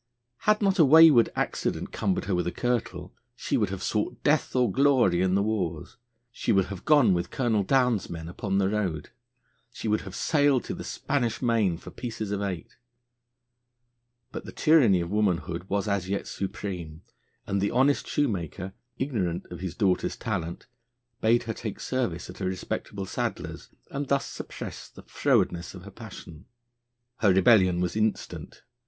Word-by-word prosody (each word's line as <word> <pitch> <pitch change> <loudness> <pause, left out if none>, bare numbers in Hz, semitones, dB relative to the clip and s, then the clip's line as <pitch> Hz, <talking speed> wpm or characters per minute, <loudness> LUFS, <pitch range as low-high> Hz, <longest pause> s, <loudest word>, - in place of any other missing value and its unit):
Had 215 0 +4
not 195 -1 +2
a - - +9
wayward 150 -4 +7
accident - - -2
cumbered 95 -2 -1
her 100 - -1
with 90 -1 0
a - - 0
kirtle, 110 -8 -2 0.2
she - - -2
would 105 -4 +1
have 95 -1 -5
sought 105 -1 -2
death 150 -2 +2
or 125 -5 +3
glory 130 -9 +3
in 95 0 +2
the 100 - +2
wars; 95 -7 -3 0.3
she 115 - -1
would 95 -3 +3
have 95 - -10
gone 145 -10 +5
with 85 0 -1
Colonel 115 -5 +1
Downe's 125 -1 +2
men 80 -1 -6
upon 95 +3 -2
the 95 -1 +2
road; 95 -7 -2 0.6
she 115 - -6
would 105 0 +1
have 95 - -9
sailed 145 -4 +2
to - - -5
the - - -7
Spanish 125 -5 -1
Main 110 -8 +2
for - - -11
pieces 115 -4 -5
of 100 -1 -1
eight. 95 -5 -5 1.5
But - - -6
the - - -8
tyranny 125 - +4
of 85 +1 -4
womanhood 90 -4 0
was 100 +1 0
as 100 -2 -1
yet 100 - -2
supreme, 90 -5 -5 0.4
and 100 0 -1
the 100 - +1
honest 135 +3 +2
shoemaker, 95 - -2 0.2
ignorant 100 -11 -2
of 90 - -7
his 95 -2 -5
daughter's 100 -5 +1
talent, 85 -6 -4 0.6
bade 115 +2 +3
her 110 - -3
take 110 -1 -6
service 120 -10 -2
at - - -11
a - - -1
respectable 95 +1 -4
saddler's, - - -4 0.2
and 140 0 -3
thus 140 0 +1
suppress - - -8
the - - -14
frowardness 85 +2 0
of 90 - -10
her 100 - -10
passion. 95 -7 -11 0.7
Her 105 -5 +4
rebellion 95 -2 +5
was 90 +1 -1
instant. 110 0 -2
100 Hz, 170 wpm, -27 LUFS, 90-120 Hz, 1.5 s, a